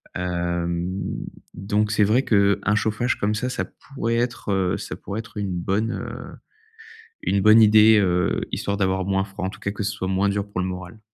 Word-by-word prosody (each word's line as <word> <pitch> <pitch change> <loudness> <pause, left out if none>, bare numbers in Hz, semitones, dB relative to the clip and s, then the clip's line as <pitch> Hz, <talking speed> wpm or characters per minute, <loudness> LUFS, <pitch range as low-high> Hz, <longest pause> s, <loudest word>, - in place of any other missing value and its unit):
Hem 85 0 -2 0.6
donc 105 +3 -1
c'est 105 -1 +3
vrai 120 +6 +3
qu'un 100 -1 +2
chauffage 110 +3 0
comme 105 +1 0
ça, 125 +4 -2
ça - - -2
pourrait 115 -4 -4
être, 120 -3 -2
heu, 95 -2 +1
ça - - -6
pourrait 100 +3 -6
être 115 -1 -10
une 100 -2 -2
bonne, 100 +6 -1
heu, - - -7 0.9
une 100 - +1
bonne 110 +2 +7
idée, 110 0 +7
heu, 90 -2 +1
histoire 100 0 -2
d'avoir 95 -1 0
moins 95 0 +1
froid, 95 -2 -6
en - - -1
tout - - -11
cas, 100 - -3
que 105 0 -4
ce 100 - -1
soit 95 -2 -4
moins 95 +1 +1
dur 100 0 -2
pour 90 -2 -2
le 90 - -1
moral. 90 +3 -7
100 Hz, 200 wpm, -23 LUFS, 95-110 Hz, 0.9 s, bonne